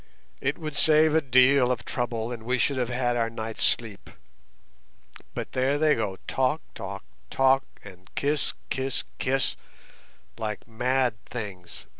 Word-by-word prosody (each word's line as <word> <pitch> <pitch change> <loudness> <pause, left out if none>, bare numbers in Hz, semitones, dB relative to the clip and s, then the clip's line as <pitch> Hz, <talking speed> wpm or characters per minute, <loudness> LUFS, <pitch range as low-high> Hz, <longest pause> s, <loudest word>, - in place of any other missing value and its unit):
It 140 +2 0
would 155 -3 -5
save 155 0 +5
a 160 - +4
deal 130 -1 +5
of 120 -2 -2
trouble, 120 -1 -2
and 120 -2 -5
we 125 +3 0
should 130 +4 +1
have 125 -2 0
had 125 -1 0
our 115 -1 +1
night's 115 -1 -4
sleep. 110 -4 0 1.3
But - - -4
there 130 +3 +1
they 155 0 +4
go, 100 -4 -2
talk, 130 +4 +1
talk, 100 +1 -6 0.3
talk, 135 0 +3 0.2
and 95 -1 -13
kiss, 145 +1 0 0.2
kiss, 135 0 -1 0.2
kiss, 135 +1 +1 0.8
like 105 0 -4
mad 120 0 0
things. 100 -7 -7
125 Hz, 145 wpm, -27 LUFS, 110-135 Hz, 1.3 s, save